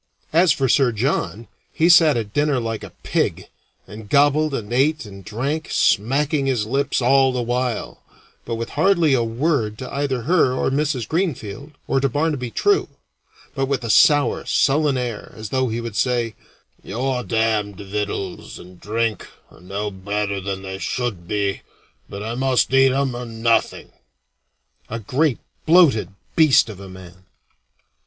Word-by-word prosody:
As 170 +1 +5
for 135 - +1
Sir 130 0 +3
John, 115 - -2 0.2
he 165 - +2
sat 165 -5 +6
at 105 -3 -4
dinner 145 -2 +1
like 115 -2 -4
a - - -8
pig, - - -1 0.4
and 105 0 -11
gobbled 145 +3 +3
and 115 -1 -5
ate 140 +2 +1
and 100 -2 -11
drank, 135 +10 -3
smacking 135 +6 +1
his 120 -6 0
lips 135 +2 -1
all 135 +1 +4
the 125 -1 -2
while, 125 0 -3 0.4
but 115 - -4
with 115 0 -5
hardly 170 -2 +2
a 120 -3 +2
word 115 -2 -1
to 130 - -8
either 140 -4 -1
her 155 -3 +3
or 130 - 0
Mrs. 140 -4 -1
Greenfield 145 - -3
or 135 - +1
to 135 0 +1
Barnaby 145 -2 -1
True; 405 - +1 0.7
but 135 -1 -1
with 135 -2 -1
a 115 - 0
sour, 145 +4 +4
sullen 145 0 +2
air, 120 -4 -5
as 110 -1 -7
though 130 +1 0
he 115 +1 -3
would 115 -3 -6
say, 120 -2 0 0.5
"Your 125 +3 -2
damned 110 -3 0
victuals 100 -2 -5
and 90 0 -14
drink 110 -1 -2 0.2
are - - -18
no 100 +3 -4
better 100 +1 -3
than 95 0 -5
they 95 0 -6
should 105 -9 -3
be, 100 -1 -1 0.5
but 100 +1 -7
I 115 +2 -4
must 130 +1 +1
eat 135 0 +5
'em 135 -1 0
or 120 0 -6
nothing." 115 0 0 1.0
A 115 - -4
great 130 +5 0 0.3
bloated 160 -9 +5 0.3
beast 155 -7 +5
of 100 -3 -9
a 100 -1 -10
man! 95 0 -13
120 Hz, 160 wpm, -21 LUFS, 105-140 Hz, 1.0 s, sat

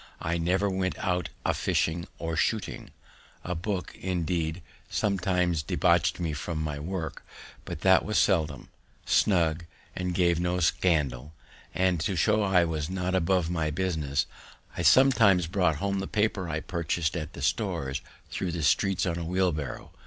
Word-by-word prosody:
I 85 +1 -1
never 95 +4 +1
went 95 -1 -1
out 90 -2 -1 0.2
a - - +2
fishing 85 +2 0
or 80 -1 -3
shooting; 110 +5 -1 0.5
a 90 - -3
book, 90 +2 -3
indeed, 85 -2 -2 0.3
sometimes 90 -4 +1
debauch'd - - +2
me 85 -3 -2
from 80 +2 -4
my 75 -2 -3
work, 80 -1 -5 0.4
but 75 - -6
that 95 -1 +5
was 110 - -1
seldom, 80 -8 +1 0.4
snug, 85 -4 +2 0.3
and 90 -1 -2
gave 85 -2 +3
no 90 +1 0
scandal; 75 -5 +1 0.4
and, 95 -2 +2
to 95 +4 -1
show 105 +6 +3
that 100 -3 0
I 85 -1 +6
was 80 -1 -3
not 90 0 -2
above 90 -1 +1
my 80 -3 0
business, 75 -3 -1 0.5
I - - -3
sometimes 115 -9 +5
brought 90 -2 +1
home 100 +5 -1
the 95 - -3
paper 105 -4 0
I 80 -1 -2
purchas'd 85 -1 -2
at 80 -2 -4
the 70 - -7
stores 80 - -1 0.3
thro' 95 - -2
the 85 -2 -3
streets 95 +7 +2
on 85 -2 -1
a - - -3
wheelbarrow. 85 -4 -2
85 Hz, 160 wpm, -28 LUFS, 80-95 Hz, 0.5 s, I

